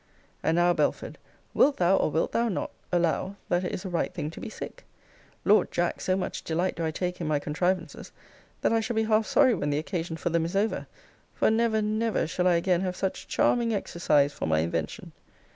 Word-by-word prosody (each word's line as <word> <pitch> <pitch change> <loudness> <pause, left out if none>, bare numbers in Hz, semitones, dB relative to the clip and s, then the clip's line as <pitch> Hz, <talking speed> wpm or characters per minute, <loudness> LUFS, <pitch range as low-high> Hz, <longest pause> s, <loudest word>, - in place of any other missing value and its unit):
And 160 - +1
now, 175 0 +4
Belford, 155 -3 -1 0.3
wilt 285 0 +4
thou, 180 +2 +4
or - - +2
wilt 160 +2 0
thou 235 0 +1
not, 195 - -3 0.2
allow, 175 +2 0
that 175 +1 +1
it 180 - -2
is 185 - -5
a - - -3
right 175 - -1
thing 150 - -4
to - - -10
be 235 - -5
sick? - - -8 0.6
Lord, 210 +2 +4
Jack, 175 0 -1
so 185 0 +1
much 190 - -4
delight 175 +3 -1
do 165 - -3
I 160 - 0
take 180 +2 -3
in 165 - -2
my 155 -1 +2
contrivances, 170 +3 -2 0.5
that - - +2
I 225 - +3
shall 225 +1 -3
be 220 - +2
half 220 0 +2
sorry 260 -4 +4
when 150 -8 -1
the 145 - 0
occasion 165 +1 -3
for 170 - -2
them 170 0 +2
is 170 +4 -4
over; 210 +3 0 0.5
for - - +3
never, 220 -1 +2
never, 215 +1 0
shall 180 +3 0
I 175 - +4
again 175 +1 +2
have 185 -1 -2
such 190 0 -3
charming 235 -2 +2
exercise 150 -7 +1
for - - -4
my 80 0 +2
invention. 80 -1 -3
180 Hz, 215 wpm, -27 LUFS, 160-215 Hz, 0.6 s, now